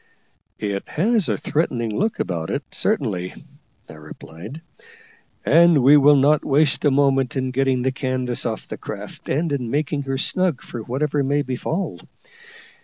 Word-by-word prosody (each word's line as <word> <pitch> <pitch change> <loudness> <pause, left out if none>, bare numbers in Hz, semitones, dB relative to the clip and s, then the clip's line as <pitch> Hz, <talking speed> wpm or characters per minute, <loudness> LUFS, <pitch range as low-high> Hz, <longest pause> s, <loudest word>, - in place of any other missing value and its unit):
"It 100 -2 -3
has 210 +3 +1
a - - 0
threatening 120 -8 -1
look 220 +2 -1
about 85 -3 -3
it, - - -2
certainly," 90 0 -2 0.5
I - - -11
replied, 80 - -11 0.8
"and 170 -5 +5
we 140 +3 +7
will 145 0 +6
not 145 +2 +3
waste 145 +1 +2
a - - +6
moment 135 -2 +2
in 130 -1 -1
getting 130 -1 +1
the 130 - +1
canvas 130 -2 -1
off 110 -2 -5
the - - -6
craft, - - -8
and 155 +4 0
in 125 -4 -2
making 145 +2 -1
her 135 - 0
snug 180 +1 0
for 120 - -7
whatever 140 +5 -1
may 145 +2 +1
befall. 140 +8 -3
135 Hz, 155 wpm, -21 LUFS, 125-150 Hz, 0.8 s, we